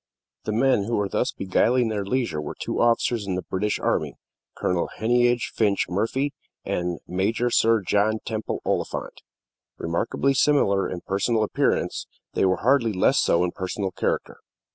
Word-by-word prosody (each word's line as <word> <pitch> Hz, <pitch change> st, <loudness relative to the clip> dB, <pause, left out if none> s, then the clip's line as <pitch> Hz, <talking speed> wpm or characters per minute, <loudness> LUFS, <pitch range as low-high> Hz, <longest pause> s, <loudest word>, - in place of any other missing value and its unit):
The -, -, -1 dB
men 120 Hz, -2 st, +2 dB
who 115 Hz, +2 st, -1 dB
were 100 Hz, -1 st, 0 dB
thus -, -, 0 dB
beguiling 115 Hz, +5 st, +1 dB
their 105 Hz, -2 st, -2 dB
leisure 100 Hz, -7 st, -1 dB
were 75 Hz, -, -6 dB
two -, -, -2 dB
officers 115 Hz, -2 st, +2 dB
in 95 Hz, -, -1 dB
the 90 Hz, -, -3 dB
British 105 Hz, +2 st, -1 dB
army -, -, -1 dB, 0.4 s
Colonel 90 Hz, -2 st, 0 dB
Heneage 120 Hz, +1 st, +2 dB
Finch 105 Hz, -3 st, +2 dB
Murphy 130 Hz, +9 st, -1 dB, 0.3 s
and 90 Hz, -1 st, -2 dB
Major 110 Hz, +7 st, 0 dB
Sir 115 Hz, -1 st, +4 dB
John 105 Hz, +2 st, +2 dB
Temple 110 Hz, -1 st, -4 dB
Oliphant. -, -, -3 dB, 0.6 s
Remarkably 85 Hz, +11 st, 0 dB
similar 130 Hz, -9 st, +3 dB
in 90 Hz, -, -5 dB
personal 110 Hz, +3 st, 0 dB
appearance, 105 Hz, -, 0 dB, 0.3 s
they -, -, +2 dB
were 95 Hz, +1 st, +1 dB
hardly 125 Hz, -4 st, +3 dB
less 95 Hz, -, +3 dB
so 85 Hz, -, +3 dB
in 90 Hz, -, 0 dB
personal 95 Hz, +1 st, -3 dB
character. -, -, -2 dB
105 Hz, 155 wpm, -24 LUFS, 95-120 Hz, 0.6 s, Sir